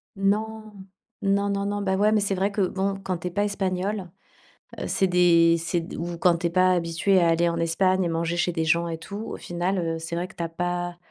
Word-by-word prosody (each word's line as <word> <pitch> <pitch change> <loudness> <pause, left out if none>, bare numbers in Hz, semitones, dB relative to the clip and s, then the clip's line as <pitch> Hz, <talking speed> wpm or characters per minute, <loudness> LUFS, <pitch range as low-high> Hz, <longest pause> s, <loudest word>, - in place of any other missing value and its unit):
Non, 215 +2 -1 0.5
non, 200 0 +1
non, 200 0 -1
non, 205 0 -2
bah, 190 -1 0
ouais, 210 +2 +3
mais, 215 - +3
c'est 200 -1 0
vrai 195 +2 0
que 200 0 -1
bon, 195 +1 0
quand 185 -2 -2
tu 180 - -4
es 180 - -4
pas 205 +3 0
espagnole, 195 -1 -2 0.7
heu, - - -3
c'est 190 - +1
des 170 -2 +5
c'est 165 +1 -1
d 165 - -8
ou 170 0 -4
quand 170 0 +3
tu 170 - 0
es - - -2
pas 185 +1 +3
habitué 175 +2 +2
à 170 -1 +3
aller 170 +1 +3
en 170 - -2
Espagne 185 +3 +2
et - - 0
manger 165 +1 -1
chez 175 0 +1
des 165 -2 -1
gens 170 +1 +2
et 165 -1 -4
tout, 190 +5 -8
au 220 - -6
final, 175 +2 -2
heu, 165 -1 -2
c'est 165 +1 -5
vrai 175 +1 -2
que - - -18
tu 170 - -4
as 165 - -3
pas 175 +1 -3
180 Hz, 255 wpm, -25 LUFS, 170-195 Hz, 0.7 s, des